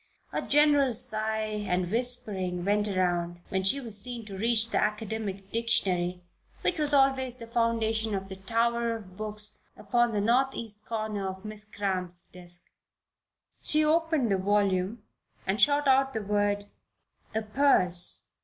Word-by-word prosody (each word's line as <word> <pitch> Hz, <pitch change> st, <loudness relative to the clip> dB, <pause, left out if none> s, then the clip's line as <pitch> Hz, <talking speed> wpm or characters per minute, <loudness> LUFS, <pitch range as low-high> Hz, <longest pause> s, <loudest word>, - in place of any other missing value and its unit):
A -, -, -1 dB
general 290 Hz, -4 st, +3 dB
sigh 215 Hz, -1 st, 0 dB
and 180 Hz, -1 st, -1 dB
whispering 200 Hz, -7 st, +1 dB
went 205 Hz, +1 st, +1 dB
around 175 Hz, -3 st, -1 dB
when 190 Hz, 0 st, -1 dB
she 230 Hz, +9 st, +3 dB
was 220 Hz, -6 st, +3 dB
seen 240 Hz, -1 st, -3 dB
to 200 Hz, -2 st, -8 dB
reach 225 Hz, +2 st, +2 dB
for 230 Hz, -, -10 dB
the -, -, +2 dB
academic 210 Hz, -2 st, -4 dB
dictionary 180 Hz, -6 st, 0 dB, 0.4 s
which -, -, 0 dB
was 295 Hz, -1 st, +1 dB
always 270 Hz, -3 st, +3 dB
the 235 Hz, -2 st, -9 dB
foundation 225 Hz, -2 st, 0 dB
of 195 Hz, 0 st, -4 dB
the 190 Hz, -, -7 dB
tower 230 Hz, +3 st, 0 dB
of 190 Hz, -5 st, -11 dB
books 210 Hz, 0 st, -1 dB, 0.2 s
upon 240 Hz, -1 st, +1 dB
the 210 Hz, -, -1 dB
northeast 230 Hz, -2 st, 0 dB
corner 215 Hz, -3 st, -3 dB
of 190 Hz, +2 st, -9 dB
Miss 215 Hz, 0 st, -6 dB
Cramp's 185 Hz, -4 st, -2 dB
desk. 175 Hz, -1 st, -8 dB, 1.0 s
She 305 Hz, 0 st, +3 dB
opened 315 Hz, -6 st, +1 dB
the 195 Hz, -, +3 dB
volume 200 Hz, +1 st, 0 dB, 0.4 s
and 195 Hz, +4 st, -1 dB
shot 290 Hz, 0 st, +4 dB
out 270 Hz, 0 st, +3 dB
the 220 Hz, -, -2 dB
word: 205 Hz, 0 st, 0 dB, 0.7 s
"Aperse." 215 Hz, -6 st, +3 dB
215 Hz, 145 wpm, -28 LUFS, 195-235 Hz, 1.0 s, shot